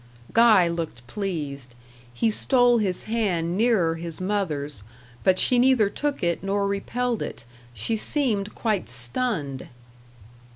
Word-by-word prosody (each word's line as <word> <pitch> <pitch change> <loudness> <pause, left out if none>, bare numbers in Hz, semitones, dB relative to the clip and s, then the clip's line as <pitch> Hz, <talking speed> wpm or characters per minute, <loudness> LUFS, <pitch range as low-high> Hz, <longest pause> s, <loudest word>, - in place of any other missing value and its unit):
Guy 220 -6 +6
looked 165 -8 -4
pleased. 140 - -5 0.4
He 220 - +1
stole 245 +1 +3
his 190 -4 -1
hand 185 -7 -1
nearer 205 -7 +2
his 165 -1 -3
mother's, 160 - -2 0.4
but 185 -1 +4
she 250 +4 +3
neither 245 -5 +4
took 290 -2 -2
it 170 -1 0
nor 200 +1 0
repelled 235 +4 -2
it; - - -6 0.3
she 115 - -1
seemed 215 -4 -1
quite 215 - -1
stunned. 135 - -3
195 Hz, 125 wpm, -24 LUFS, 165-230 Hz, 0.4 s, Guy